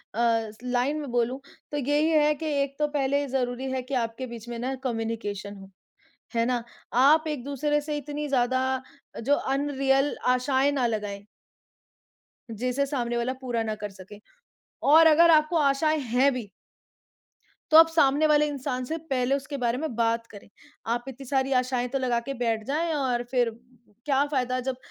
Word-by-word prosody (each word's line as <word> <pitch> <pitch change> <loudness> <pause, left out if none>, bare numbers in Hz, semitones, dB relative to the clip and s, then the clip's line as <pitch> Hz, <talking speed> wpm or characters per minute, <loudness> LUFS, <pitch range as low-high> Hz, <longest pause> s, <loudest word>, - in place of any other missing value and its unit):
अ, 230 -1 +2 0.2
line 250 +4 0
में 280 - -6
बोलूँ 245 +2 0 0.3
तो 290 - -2
यही 290 +3 +1
है 300 -1 +4
कि 315 - -7 0.2
एक 275 0 -6
तो 300 - +2
पहले 280 +1 +1
ज़रूरी 260 0 -2
है 260 -1 -1
कि 275 +2 -8
आपके 230 +3 -7
बीच 235 0 -9
में 235 - -5
ना 260 +2 -2
कम्युनिकेशन 225 -4 -3
हो, 195 0 -12 0.7
है 230 0 +2
ना? 245 -2 0 0.3
आप 295 +6 +5
एक-दूसरे 295 +1 -1
से 295 0 -4
इतनी 295 +1 -5
ज़्यादा 260 0 +1 0.6
जो 285 +5 +3 0.2
अनरियल 275 0 +1
आशाएँ 265 +2 +2
ना 260 -4 +1
लगाएँ 205 -2 -4 1.2
जिसे 250 +5 -1
सामने 240 -4 -2
वाला 240 +2 -1
पूरा 240 -3 -2
ना 215 -1 -2
कर 205 - -3
सके। 195 +2 -13 0.7
और 320 +2 +8
अगर 335 +2 +6
आपको 310 +2 +4
आशाएँ 305 +2 +2
हैं 255 +2 +2
भी 230 -6 -6 1.2
तो 310 - +7
आप 325 0 +9
सामने 310 -1 +3
वाले 300 0 +4
इंसान 255 -3 -3
से 320 +6 -3
पहले 260 +1 +1
उसके 280 +1 -4
बारे 235 +1 +1
में 305 -5 -4
बात 230 0 0
करें। 205 -1 -13 0.5
आप 240 0 -4
इतनी 265 +1 -9
सारी 270 0 0
आशाएँ 250 -1 -2
तो 270 - -2
लगा 245 -2 0
के 275 - -2
बैठ 225 -2 0
जाएँ 320 +4 -1
और 255 -4 0
फिर 245 -3 +2 0.6
क्या 280 -1 +3
फायदा 255 -1 0
जब 255 - -1
260 Hz, 170 wpm, -26 LUFS, 240-285 Hz, 1.2 s, आप